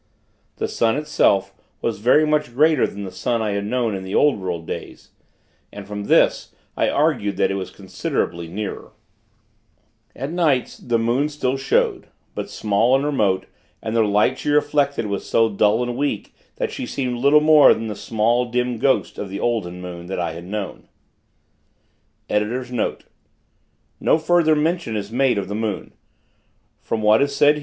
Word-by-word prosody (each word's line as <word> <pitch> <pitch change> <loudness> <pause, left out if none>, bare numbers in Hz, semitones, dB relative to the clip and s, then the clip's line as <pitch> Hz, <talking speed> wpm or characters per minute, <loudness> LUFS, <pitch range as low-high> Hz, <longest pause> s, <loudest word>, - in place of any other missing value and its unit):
The - - -2
sun, 115 -1 +1
itself, 100 -10 +1 0.3
was 115 -3 -2
very 125 +8 +4
much 150 -5 0
greater 155 0 +4
than 100 - -8
the 95 - -6
sun 115 +5 -1
I 110 -2 -1
had 100 0 -2
known 120 -1 0
in 95 - -4
the 95 +1 -5
old 145 -7 +3
world 90 -3 -4
days; - - -8 0.6
and, 100 -1 -9
from 105 0 -5
this, - - +2 0.2
I - - +1
argued 140 -10 0
that - - +2
it - - -1
was 95 -1 -4
considerably 90 -3 -3
nearer. 100 +4 -6 1.2
At 135 +4 -5
nights, 160 -7 +1
the 120 -1 0
moon 120 +6 +1
still 140 -3 -1
showed; 135 0 0 0.3
but - - -5
small 110 +5 +2
and 135 +2 +1
remote; 105 -10 +1 0.3
and 110 - -4
the 115 - +4
light 105 +4 +2
she - - -3
reflected 145 -3 +1
was 100 -1 -4
so 115 0 +3
dull 105 +3 +2
and 120 0 -3
weak 140 -6 -2 0.2
that - - -2
she - - -5
seemed 125 -2 -3
little 140 +4 +5
more 155 -1 +7
than 115 - 0
the 105 -2 -4
small, 115 +4 +1
dim 125 -1 -1
ghost 135 +2 +1
of 100 - -5
the 100 +1 -5
olden 95 -7 -2
moon, 85 -1 -8
that 95 - -4
I 85 -2 -1
had 85 +1 -9
known. 100 0 -6
115 Hz, 145 wpm, -21 LUFS, 100-135 Hz, 1.2 s, more